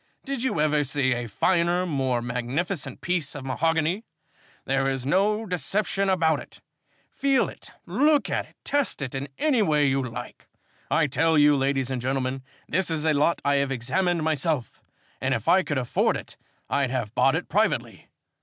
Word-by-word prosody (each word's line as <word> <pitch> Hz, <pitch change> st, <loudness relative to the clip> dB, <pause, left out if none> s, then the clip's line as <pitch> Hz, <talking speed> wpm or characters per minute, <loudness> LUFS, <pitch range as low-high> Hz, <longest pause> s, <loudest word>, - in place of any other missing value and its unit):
Did 275 Hz, -2 st, -3 dB
you 255 Hz, -11 st, 0 dB
ever 150 Hz, -1 st, +2 dB
see 135 Hz, -1 st, +1 dB
a 120 Hz, -1 st, -3 dB
finer, 175 Hz, -, +1 dB
a -, -, -2 dB
more 130 Hz, -7 st, 0 dB
magnificent 130 Hz, +5 st, -3 dB
piece 175 Hz, -6 st, -2 dB
of 140 Hz, -2 st, -7 dB
mahogany? 165 Hz, -, 0 dB, 0.6 s
There 135 Hz, 0 st, +1 dB
is 135 Hz, -2 st, -3 dB
no 210 Hz, +8 st, +2 dB
deception 195 Hz, +1 st, -1 dB
about 160 Hz, -5 st, +2 dB
it. -, -, -12 dB, 0.5 s
Feel 275 Hz, -1 st, +2 dB
it, -, -, -11 dB, 0.2 s
look 295 Hz, +1 st, +2 dB
at -, -, -2 dB
it, -, -, -25 dB
test 285 Hz, -, 0 dB
it 130 Hz, -, -5 dB
in 135 Hz, +1 st, -4 dB
any 285 Hz, -7 st, +2 dB
way 150 Hz, -6 st, +3 dB
you 135 Hz, 0 st, +1 dB
like. 120 Hz, -1 st, -7 dB, 0.4 s
I 165 Hz, -, +3 dB
tell 160 Hz, +4 st, +2 dB
you, 145 Hz, 0 st, +6 dB
ladies 135 Hz, -1 st, 0 dB
and 130 Hz, -2 st, -2 dB
gentlemen, 130 Hz, +1 st, -1 dB, 0.3 s
this 185 Hz, +3 st, 0 dB
is 160 Hz, -1 st, -1 dB
a 160 Hz, -, +3 dB
lot 150 Hz, +4 st, +2 dB
I 140 Hz, 0 st, +3 dB
have 140 Hz, -1 st, 0 dB
examined 170 Hz, +7 st, 0 dB
myself, 155 Hz, -5 st, -1 dB, 0.4 s
and 130 Hz, 0 st, +1 dB
if 115 Hz, -, -5 dB
I 190 Hz, -, +6 dB
could 150 Hz, -6 st, -2 dB
afford 125 Hz, -2 st, +1 dB
it -, -, -9 dB, 0.3 s
I'd 140 Hz, -2 st, 0 dB
have 120 Hz, -4 st, -3 dB
bought 135 Hz, +3 st, +3 dB
it 170 Hz, -, -3 dB
privately. 215 Hz, +3 st, -1 dB
150 Hz, 180 wpm, -25 LUFS, 135-180 Hz, 0.6 s, you